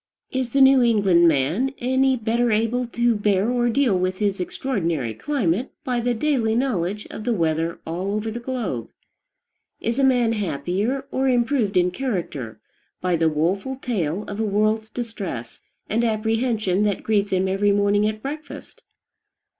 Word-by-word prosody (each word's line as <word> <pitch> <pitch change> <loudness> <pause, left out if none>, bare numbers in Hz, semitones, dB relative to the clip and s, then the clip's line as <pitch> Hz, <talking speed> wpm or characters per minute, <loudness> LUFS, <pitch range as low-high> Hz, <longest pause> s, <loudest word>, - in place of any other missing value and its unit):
Is 260 -2 -1
the 275 +3 +2
New 265 -1 +7
England 200 -7 +4
man 165 - +1
any 260 +1 +2
better 235 0 0
able 230 +3 +1
to 235 0 +1
bear 205 +1 +1
or 240 -1 +1
deal 235 -3 +2
with 185 +1 0
his 200 -2 0
extraordinary 170 - -2
climate 235 - -1
by 250 -4 -1
the 240 +1 0
daily 230 -4 +1
knowledge 210 -5 -1
of - - -7
the 235 0 0
weather 165 -1 0
all 185 +5 -3
over 215 +1 -2
the 235 - -5
globe? 235 - -4 0.9
Is 235 +3 -2
a - - +3
man 245 -4 +3
happier, 200 - -2
or 265 0 +1
improved 240 -5 +1
in 180 0 +3
character, 175 - -4 0.4
by 180 -1 0
the 165 -1 +2
woful 185 - -1
tale 205 - -2
of 205 0 -7
a - - +1
world's 215 +1 +1
distress 200 - -6 0.3
and 225 +3 0
apprehension 220 -3 0
that 205 -2 0
greets 205 -2 +1
him 190 0 +1
every 195 +2 +2
morning 205 +1 +2
at 215 0 -4
breakfast? 300 +3 -8
215 Hz, 160 wpm, -23 LUFS, 185-245 Hz, 0.9 s, New